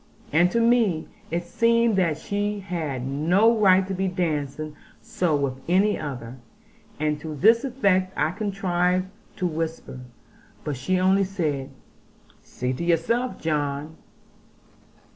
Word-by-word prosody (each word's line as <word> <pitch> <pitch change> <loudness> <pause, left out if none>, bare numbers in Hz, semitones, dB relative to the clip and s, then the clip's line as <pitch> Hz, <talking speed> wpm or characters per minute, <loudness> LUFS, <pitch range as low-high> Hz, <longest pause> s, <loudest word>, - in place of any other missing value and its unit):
And 175 +3 +5
to 230 - 0
me 230 -8 +2 0.2
it 170 +2 -2
seemed 230 +4 +2
that 170 -5 +2
she 205 +4 -2
had 155 -9 -4
no 175 - +3
right 190 -3 +5
to 195 - -4
be 190 +1 -1
dancing 155 -4 -2 0.2
so 170 -4 -1
with 135 -2 -2
any 195 +4 +3
other; 130 -4 -6 0.6
and 150 -1 0
to 155 0 -6
this 225 - +5
effect 200 -8 +1
I 155 - +1
contrived 185 -2 0 0.3
to 185 - -2
whisper; 160 -5 -4 0.6
but 150 - -3
she 180 +9 0
only 190 +2 +3
said, 155 -8 -2 0.7
'See 125 +1 -4
to 130 - -4
yourself, 175 +10 0
John. 150 0 -2
175 Hz, 130 wpm, -24 LUFS, 150-195 Hz, 0.7 s, And